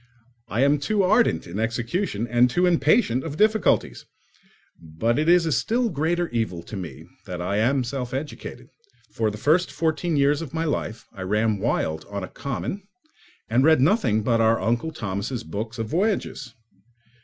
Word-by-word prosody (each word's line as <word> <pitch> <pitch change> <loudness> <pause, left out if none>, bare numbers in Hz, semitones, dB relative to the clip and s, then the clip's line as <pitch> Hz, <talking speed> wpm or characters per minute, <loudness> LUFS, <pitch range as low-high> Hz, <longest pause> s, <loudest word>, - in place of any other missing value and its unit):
I 115 +5 -1
am 140 +1 +3
too 195 +8 +1
ardent 215 +6 +3
in 90 +5 -6
execution 115 - -1
and 120 +1 +4
too 175 +8 +2
impatient 160 - +3
of 155 -2 -5
difficulties. 215 +1 +2 0.7
But 85 - -1
it 155 +2 +1
is 175 -1 +5
a 160 - 0
still 235 - +1
greater 170 +2 0
evil 110 -8 -2
to 105 - -9
me 80 -5 -7 0.2
that 90 -2 -5
I 90 +3 -1
am 130 +5 +2
self 125 0 -4
educated: 140 +3 -6 0.4
for 110 -1 0
the 105 - -6
first 160 +10 +2
fourteen 160 0 -1
years 140 +2 +3
of 160 -2 -7
my 160 - 0
life 115 -7 -3
I 95 - -9
ran 105 +2 0
wild 80 -4 -1
on 100 -1 -4
a - - -4
common 140 +8 -4 0.7
and 120 +4 +2
read 160 -1 +5
nothing 130 - +2
but 115 0 +2
our 115 0 +3
Uncle 120 +8 -1
Thomas' 110 -1 -4
books 110 +3 -5
of 110 -1 -4
voyages. 180 - -1
125 Hz, 170 wpm, -24 LUFS, 110-160 Hz, 0.7 s, is